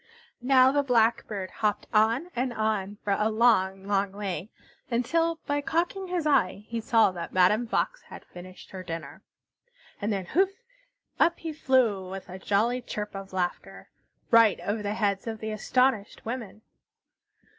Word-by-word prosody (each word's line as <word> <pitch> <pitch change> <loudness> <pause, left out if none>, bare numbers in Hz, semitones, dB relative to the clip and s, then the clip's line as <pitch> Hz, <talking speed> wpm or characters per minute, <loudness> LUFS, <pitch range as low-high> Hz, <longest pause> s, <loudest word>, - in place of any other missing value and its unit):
Now 260 +1 +5
the 285 +1 +2
Blackbird 225 -6 +1
hopped 210 -1 -1
on 230 +11 +2
and 250 +1 -1
on 215 -2 -1
for 200 - +1
a 210 +2 +1
long, 195 -4 +2
long 200 -1 0
way, 195 -2 -4 0.4
until, 330 +8 +1
by 290 0 0
cocking 350 +6 -1
his 355 -3 -2
eye, 210 -8 +1
he 230 -1 -3
saw 225 -4 +4
that 170 -2 -7
Madame 210 +6 +3
Fox - - -1
had - - -12
finished 185 +1 -12
her 190 - -7
dinner. 165 -2 -7 0.8
And 205 +2 -1
then, 195 -3 -2
houff! 375 - +2 0.7
Up 340 - +3
he 325 -2 -5
flew, 240 -10 +1
with 190 0 -8
a 185 +1 -8
jolly 225 +6 +1
chirp 210 -3 -5
of 195 0 -7
laughter, 180 -2 -4 0.4
right 230 -3 +6
over 210 +2 -2
the 205 0 -2
heads 200 -1 -1
of 220 -1 -4
the 220 0 -4
astonished 220 0 0
women. 225 -3 -6
220 Hz, 155 wpm, -27 LUFS, 195-255 Hz, 0.8 s, right